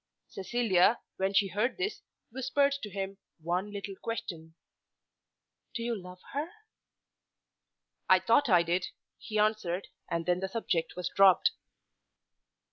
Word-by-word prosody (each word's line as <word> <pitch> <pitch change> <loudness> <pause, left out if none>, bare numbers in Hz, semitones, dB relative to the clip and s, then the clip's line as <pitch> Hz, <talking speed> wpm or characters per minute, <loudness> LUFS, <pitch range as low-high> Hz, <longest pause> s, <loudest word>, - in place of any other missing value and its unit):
Cecilia, 210 0 +2 0.2
when 190 +1 +1
she 195 0 +4
heard 215 +7 0
this, 380 +3 -2 0.3
whispered 265 +3 +1
to 210 - -5
him 195 0 -5 0.2
one 180 +5 -2
little 200 -1 -5
question, 165 -8 -5 1.2
"Do 230 - -2
you 235 0 -1
love 180 -2 -10
her?" 295 +4 -2 1.6
"I - - +8
thought 285 -3 +3
I 175 -3 +6
did," 175 +2 0 0.3
he 215 - -4
answered. 210 -4 0 0.2
And 165 0 -1
then 180 0 +2
the 190 +1 -3
subject 190 -6 -1
was 180 -1 -3
dropped. 195 - +6
195 Hz, 125 wpm, -30 LUFS, 180-230 Hz, 1.6 s, I